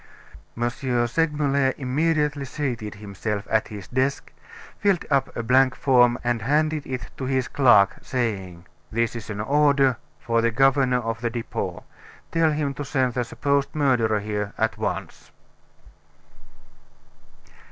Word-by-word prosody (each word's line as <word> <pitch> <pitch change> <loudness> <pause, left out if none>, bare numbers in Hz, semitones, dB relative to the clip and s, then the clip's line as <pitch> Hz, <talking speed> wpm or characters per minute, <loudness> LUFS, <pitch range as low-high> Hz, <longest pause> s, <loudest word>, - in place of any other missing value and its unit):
M. 120 0 +1 0.4
Segmuller 140 -2 +1
immediately 150 +2 0
seated 120 -7 -4
himself 100 0 -5
at 110 0 +2
his 105 -3 -9
desk, 130 +2 -1 0.5
filled 200 -4 +1
up 135 -1 +2
a 115 - -2
blank 130 +2 +4
form 125 -3 +4
and 120 -1 0
handed 150 +4 0
it 125 -6 -5
to 135 - -4
his 130 -1 0
clerk, 120 -8 +4
saying: 95 -9 -3 0.3
"This 115 +1 0
is 115 -2 -7
an 105 -1 -5
order 140 +1 +3 0.2
for 115 0 0
the 115 - +2
governor 130 +1 +3
of 115 0 -4
the 120 - 0
Depot. 115 -1 -4 0.5
Tell 165 -1 +3
him 150 -2 -1
to 145 - -5
send 130 -3 0
the 125 - 0
supposed 140 +4 -1
murderer 120 -8 +2
here 105 -1 -3
at 110 0 0
once." - - -5
125 Hz, 135 wpm, -24 LUFS, 115-140 Hz, 0.5 s, blank